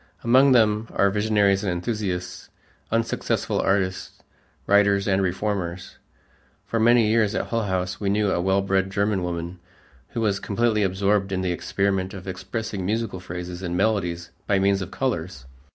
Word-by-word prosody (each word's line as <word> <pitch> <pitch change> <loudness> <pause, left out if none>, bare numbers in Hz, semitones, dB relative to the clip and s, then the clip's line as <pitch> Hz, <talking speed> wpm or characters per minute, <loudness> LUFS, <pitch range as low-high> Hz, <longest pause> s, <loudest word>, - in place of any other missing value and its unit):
Among 130 +4 +5
them 110 -2 +3
are 100 0 +3
visionaries 105 -2 +2
and 95 - 0
enthusiasts, 90 -1 -3 0.4
unsuccessful 115 0 -1
artists, 95 -1 -1 0.4
writers, 100 0 +3
and 95 -1 +2
reformers. 95 -1 -3 0.7
For 115 - -2
many 120 0 +5
years 110 -1 +2
at - - -2
Hull 115 -2 0
House, 95 -1 -2
we 100 - -1
knew 105 0 +1
a 85 - 0
well 95 +2 +2
bred 95 -1 +1
German 100 0 0
woman 85 0 -4 0.5
who 115 - -2
was 100 -3 +1
completely 110 +1 0
absorbed 100 +1 +1
in 95 -1 -1
the 90 - 0
experiment 95 +2 -1
of 95 0 -9
expressing 95 +2 -4
musical 105 0 -2
phrases 90 0 -7
and 90 -1 -3
melodies 90 -5 0 0.2
by 100 - +3
means 100 0 +2
of 95 - -5
colors. 90 - -3
100 Hz, 155 wpm, -24 LUFS, 90-105 Hz, 0.7 s, Among